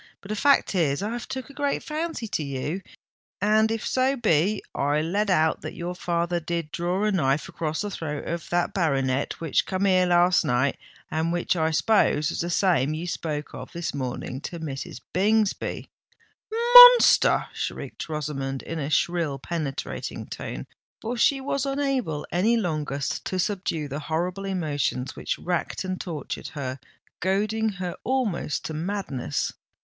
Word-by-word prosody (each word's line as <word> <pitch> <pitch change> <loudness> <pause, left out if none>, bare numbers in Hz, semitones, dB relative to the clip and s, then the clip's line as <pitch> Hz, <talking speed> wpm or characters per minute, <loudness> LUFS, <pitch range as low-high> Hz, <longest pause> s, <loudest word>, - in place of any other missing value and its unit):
But 195 - -13
the 215 - -1
fact 280 +2 +3
is 160 -3 +1
I've 230 +3 -4
took 260 +1 -6
a - - -15
great 285 0 -1
fancy 315 -5 -3
to - - -1
you: 140 +6 -3 0.6
and 215 +2 +3
if 225 0 -2
so 260 +1 +2
be 210 - +2
I 145 +2 +1
let 200 +7 0
out 160 -3 +2
that - - -6
your 175 +1 -4
father 175 0 -1
did 165 -1 -3
draw 180 +4 -1
a 215 - +2
knife 145 -6 +1
across 160 -1 -3
the 205 -1 -3
throat 150 -5 -4
of 170 -1 -4
that 175 +2 0
baronet 135 -7 0
which 165 -3 0
come 190 +1 0
here 185 -2 +4
last 175 +1 +4
night, 125 +3 +1 0.3
and 160 +1 0
which 175 +1 0
I 160 -2 +1
s'pose 160 -3 +2
was - - -4
the 170 - -2
same 170 -6 +2
you 165 +3 -4
spoke 155 -4 -4
of - - -8
this 170 0 -3
morning 130 -1 -4
to 170 - -6
Mrs. 135 -5 -6
Bingsby——" 210 +2 +1 0.6
"Monster!" 485 +2 +8
shrieked - - -5
Rosamond, 135 -3 -3
in 165 - -5
a 140 -1 -2
shrill, 165 -2 +1
penetrating 150 -1 -4
tone—for 235 +2 -7
she 275 +3 +3
was 270 0 -1
unable 275 - -1
any 215 +7 +3
longer 155 -8 -2 0.2
to 185 - -3
subdue 180 -5 -1
the 140 +1 -4
horrible 175 +5 -2
emotions 150 -8 -2
which - - -3
racked 175 +2 -2
and 185 -1 -3
tortured 160 -7 -5
her, 135 -3 -5 0.4
goading 215 +4 +1
her 180 -2 -4
almost 240 - -1
to 160 - -4
madness. 155 - -2
175 Hz, 160 wpm, -25 LUFS, 150-210 Hz, 0.6 s, Monster